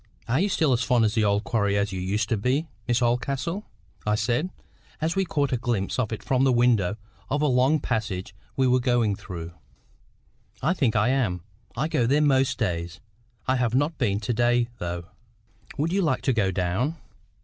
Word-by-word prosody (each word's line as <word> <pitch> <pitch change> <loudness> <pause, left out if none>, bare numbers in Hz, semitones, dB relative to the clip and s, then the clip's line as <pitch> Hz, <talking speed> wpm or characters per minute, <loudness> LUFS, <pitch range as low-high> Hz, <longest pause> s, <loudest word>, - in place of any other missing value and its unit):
"Are 125 +5 +1
you 200 +3 +2
still 155 -7 +2
as 120 - +1
fond 125 -3 +3
of 105 - +1
the 110 -2 +2
old 100 0 +2
quarry 100 -2 +1
as 100 0 0
you 95 -1 -4
used 105 +3 0
to 115 - +2
be, 125 +9 0 0.2
Miss 120 0 +2
Oldcastle?" 135 - -1 0.4
I 105 0 +1
said, 120 +10 0 0.5
as 160 +3 -1
we 195 0 +1
caught 145 -5 0
a 125 - +1
glimpse 115 -3 -1
of 115 -4 0
it 110 - -5
from 130 0 +1
the 135 - +4
window 115 -5 +3 0.3
of 145 +2 0
a - - +4
long 130 +3 +3
passage 105 -7 -3 0.2
we 135 - +2
were 125 0 +4
going 120 -4 +2
through. 85 -3 -7 1.1
"I 175 - +1
think 130 -11 +1
I 105 +2 +3
am. 110 -10 0 0.3
I 150 +5 +1
go 120 -7 +1
there 140 +4 +3
most 135 -3 +3
days. 85 -4 -2 0.5
I 130 0 +2
have 125 -1 0
not 145 +4 0
been 105 -6 +1
to 120 +3 -1
day, 120 +1 +2
though. 85 0 -4 0.7
Would 160 +4 0
you 195 - +2
like 150 -7 0
to 135 - +2
go 105 -5 +2
down?" 95 - -1
120 Hz, 200 wpm, -25 LUFS, 105-135 Hz, 1.1 s, the